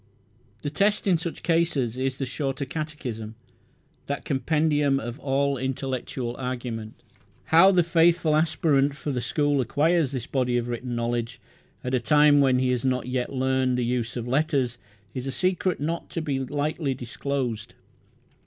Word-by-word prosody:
The 145 - -2
test 205 +6 +2
in 180 -5 +3
such 170 0 -5
cases 165 -9 +1
is 130 0 -2
the 135 - -2
Shorter 135 +1 -3
Catechism, 130 -7 -5 0.7
that 140 0 -3
compendium 145 0 +1
of 120 +2 -6
all 140 0 0
intellectual 130 -2 -3
argument. 120 -4 -4 0.6
How 180 +4 +8
the 180 -2 +4
faithful 165 -1 +3
aspirant 150 -3 +2
for 150 0 -4
the 125 -2 -2
school 145 +2 +1
acquires 150 +4 +2
this 130 -4 -4
body 125 -3 0
of 120 0 -2
written 120 +1 -4
knowledge 120 +1 -2 0.4
at 125 - -3
a 130 - +3
time 145 +4 +5
when 130 -2 +4
he 130 0 +1
has 125 -2 -1
not 130 -2 0
yet 125 0 -2
learned 130 -1 +1
the 125 - 0
use 120 -1 -2
of 120 0 -4
letters 130 -3 0 0.3
is 130 +1 -4
a - - -1
secret 185 +3 0
not 165 +4 -3
to 165 - -3
be 140 -4 -1
lightly 145 +1 -2
disclosed. 125 -2 -4
135 Hz, 160 wpm, -25 LUFS, 125-150 Hz, 0.7 s, How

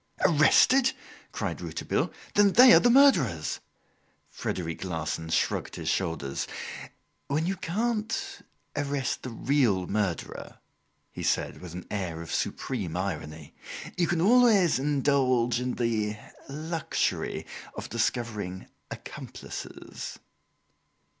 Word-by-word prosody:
"Arrested!" 190 - +5 0.4
cried - - -3
Rouletabille; - - -2 0.2
"then 205 -2 +5
they 250 0 +9
are - - +9
the 240 - +4
murderers!" 170 - +4 0.7
Frederic 85 -2 -4
Larsan 80 -2 -3
shrugged - - 0
his - - -3
shoulders. 80 -7 -2 0.8
"When 150 +3 0
you 190 +2 0
can't 230 - -2 0.3
arrest 145 -2 -1
the 130 - -6
real 115 -6 +1
murderer," 100 -4 -3 0.5
he - - -7
said - - -1
with 90 -3 -9
an 90 - -7
air 90 -6 -3
of 80 - -7
supreme 95 -10 -2
irony, 80 -5 -5 0.4
"you 175 -2 +1
can 170 -1 0
always 210 - +5
indulge 130 -4 +2
in 125 0 -2
the 110 -3 0 0.3
luxury 155 +3 -2 0.3
of - - -6
discovering 110 -5 -2 0.2
accomplices." - - -8
130 Hz, 110 wpm, -28 LUFS, -, 0.8 s, they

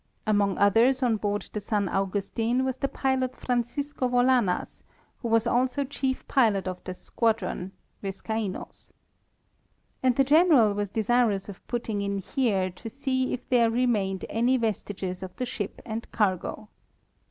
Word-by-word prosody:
Among 205 -3 +2
others 235 +6 +4
on 230 -3 +2
board 205 0 -2
the 210 - -3
San 205 -1 0
Augustin 205 +7 0
was 260 -1 -2
the 275 - 0
pilot 260 -2 -1
Francisco 255 +2 -2
Volanas, 245 -6 +2 0.4
who 235 - -4
was 225 0 +3
also 250 +3 +1
chief 265 -1 -3
pilot 215 -8 +2
of 185 -1 -5
this 185 -1 -6
squadron 210 -5 -1 0.3
(Viscaino's).... 200 +1 -5 1.1
And 255 -2 +3
the 275 - +4
general 290 - +5
was 205 -1 -2
desirous 220 -2 +1
of 195 - -11
putting 225 -4 -2
in 200 0 -1
here 195 -2 0
to 205 +6 -9
see 260 0 -1
if 250 - -4
there 235 -2 +4
remained 220 -6 0
any 245 +3 +2
vestiges 205 -5 -3
of 190 -1 -7
the 250 - -2
ship 210 -4 -5
and 225 +1 -5
cargo. 210 +1 -1
225 Hz, 145 wpm, -27 LUFS, 200-255 Hz, 1.1 s, general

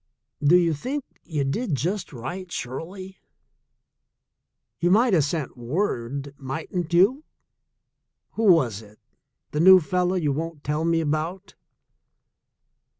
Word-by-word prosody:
"Do 160 +5 +6
you 170 -2 +2
think 260 - -4 0.2
you 150 -4 -2
did 160 - -1
just 180 +7 -2
right, 175 +9 -7
Shirley? 185 +9 -6 1.6
You 175 0 +2
might 220 +4 +4
have 160 -5 +4
sent 145 -1 -3
word, 135 - -3
mightn't 160 +5 -4
you? 200 - +4 1.1
Who 225 - -2
was 120 - +2
it 105 0 -17 0.3
— - - -53
the 150 - -2
new 185 +3 +9
fellow 180 +2 0
you 155 -6 0
won't 160 0 -5
tell 150 +3 -1
me 165 0 +2
about?" 165 +5 -3
165 Hz, 125 wpm, -24 LUFS, 140-185 Hz, 1.6 s, new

